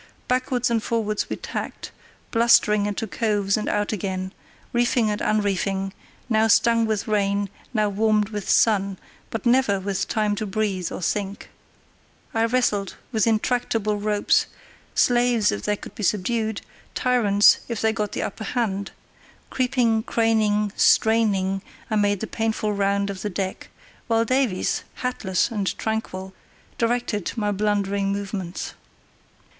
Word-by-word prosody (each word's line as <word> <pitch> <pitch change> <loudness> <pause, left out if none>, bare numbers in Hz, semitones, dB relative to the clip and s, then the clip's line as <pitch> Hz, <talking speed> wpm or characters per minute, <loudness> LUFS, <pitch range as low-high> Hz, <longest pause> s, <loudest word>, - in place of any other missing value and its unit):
Backwards 250 -1 0
and 230 -1 +2
forwards 215 -2 -1
we - - -2
tacked, - - -6 0.4
blustering 210 -3 +4
into 205 +3 -2
coves 205 -2 0
and 215 - -2
out 205 0 0
again, 190 -1 -3 0.4
reefing 240 -2 +2
and 210 - -3
unreefing, 195 -2 0 0.3
now 220 -2 +3
stung 230 +1 +4
with 215 -2 -1
rain, 200 -1 0 0.2
now 215 -3 +1
warmed 210 0 +1
with 210 -2 -5
sun, 200 -3 +3 0.3
but 225 0 -5
never 240 -5 +3
with 195 0 -2
time 210 -1 0
to 215 - -3
breathe 195 -3 -1
or - - -5
think. 200 +2 -3 0.8
I 225 -1 +2
wrestled 230 -5 0 0.2
with 220 -2 +1
intractable 225 -2 +1
ropes, 205 0 +2 0.5
slaves 240 -2 +3
if 100 - -3
they 210 - +1
could - - -11
be - - -8
subdued, 215 +2 0 0.3
tyrants 215 -6 +4
if 235 -3 -3
they 220 0 +2
got 210 -2 -3
the - - -2
upper 220 - -5
hand; 200 -5 -1 0.6
creeping, 245 -3 +2
craning, 215 -3 +1
straining, 200 -4 +3 0.3
I - - +2
made 205 -2 +2
the - - -1
painful 220 -1 -1
round 200 0 0
of 190 -1 -7
the 210 - -2
deck, 190 0 -4 0.4
while 230 0 +2
Davies, 255 -6 0 0.2
hatless 210 -6 0
and 205 -4 -2
tranquil, 190 -4 -3 0.5
directed 230 -4 0
my 210 -3 0
blundering 200 -1 0
movements. 195 -3 -4
210 Hz, 140 wpm, -23 LUFS, 200-225 Hz, 0.8 s, blustering